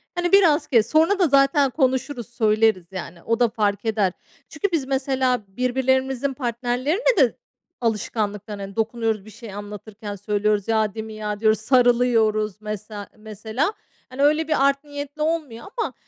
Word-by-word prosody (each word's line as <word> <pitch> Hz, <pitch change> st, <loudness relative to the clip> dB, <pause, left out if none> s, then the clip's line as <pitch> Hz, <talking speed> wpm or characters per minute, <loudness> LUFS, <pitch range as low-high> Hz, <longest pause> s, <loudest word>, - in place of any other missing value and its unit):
Hani 350 Hz, +1 st, -1 dB
biraz 330 Hz, -6 st, +5 dB
kes. 230 Hz, -3 st, +3 dB
Sonra 330 Hz, +6 st, +3 dB
da 355 Hz, -, +4 dB
zaten 275 Hz, 0 st, +4 dB
konuşuruz, 260 Hz, -3 st, -1 dB
söyleriz 215 Hz, -5 st, +2 dB
yani 175 Hz, -2 st, -8 dB
o 230 Hz, +1 st, 0 dB
da 240 Hz, -2 st, +4 dB
fark 210 Hz, -2 st, -1 dB
eder." 205 Hz, -4 st, +1 dB, 0.4 s
Çünkü 405 Hz, -3 st, -2 dB
biz 305 Hz, -6 st, 0 dB
mesela, 265 Hz, -3 st, 0 dB
birbirlerimizin 260 Hz, +4 st, 0 dB
partnerlerine 255 Hz, -, 0 dB
de 260 Hz, -6 st, +3 dB, 0.4 s
alışkanlıktan, 210 Hz, -2 st, -2 dB
hani, 195 Hz, 0 st, -7 dB
dokunuyoruz, 225 Hz, -2 st, -1 dB
bir 215 Hz, -, -12 dB
şey 225 Hz, -1 st, -10 dB
anlatırken 205 Hz, +1 st, -8 dB
söylüyoruz, 205 Hz, +1 st, 0 dB
"Ya, 220 Hz, -2 st, +1 dB
değil 220 Hz, -1 st, -5 dB
mi 220 Hz, -, -9 dB
ya?" 210 Hz, -1 st, -4 dB
diyoruz, 215 Hz, -1 st, +3 dB
sarılıyoruz 225 Hz, -4 st, +2 dB
mesela, 210 Hz, -1 st, -6 dB
mesela. 220 Hz, -, -3 dB, 0.4 s
Hani 260 Hz, +2 st, -5 dB
öyle 305 Hz, +2 st, +3 dB
bir 275 Hz, -3 st, +2 dB
art 275 Hz, +1 st, 0 dB
niyetli 290 Hz, +1 st, -7 dB
olmuyor 305 Hz, -8 st, -2 dB
ama 450 Hz, -, -1 dB
235 Hz, 155 wpm, -23 LUFS, 215-275 Hz, 0.4 s, biraz